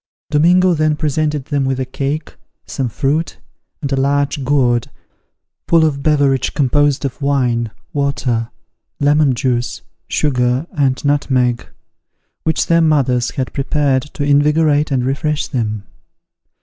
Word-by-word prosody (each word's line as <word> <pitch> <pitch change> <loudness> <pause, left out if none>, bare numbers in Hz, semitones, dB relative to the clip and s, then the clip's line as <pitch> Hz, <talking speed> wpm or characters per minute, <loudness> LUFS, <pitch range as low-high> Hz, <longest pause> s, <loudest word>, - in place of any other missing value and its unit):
Domingo 180 +4 +4
then 155 -1 +1
presented 150 -2 -1
them 140 -2 -1
with 135 -1 -1
a 130 - -1
cake, 140 +4 -4 0.3
some 130 -3 -3
fruit, 145 +7 -1 0.5
and 140 - -2
a - - +2
large 140 +1 0
gourd, 125 -4 +1 0.8
full 165 -1 +4
of 140 -3 -1
beverage 140 -3 +1
composed 145 +1 +2
of 135 +2 -5
wine, 125 -5 0 0.2
water, 135 -5 -1 0.5
lemon 145 -2 +3
juice, 120 - -2 0.2
sugar, 125 -1 0
and 135 -2 0
nutmeg, 130 -4 +1 0.8
which 160 0 +1
their 170 0 +3
mothers 130 -6 +2
had 130 -2 -3
prepared 140 -1 +1
to 145 +1 -6
invigorate 150 +1 +3
and 130 -3 0
refresh 145 +3 -1
them. 110 -6 -3
140 Hz, 125 wpm, -17 LUFS, 130-150 Hz, 0.8 s, Domingo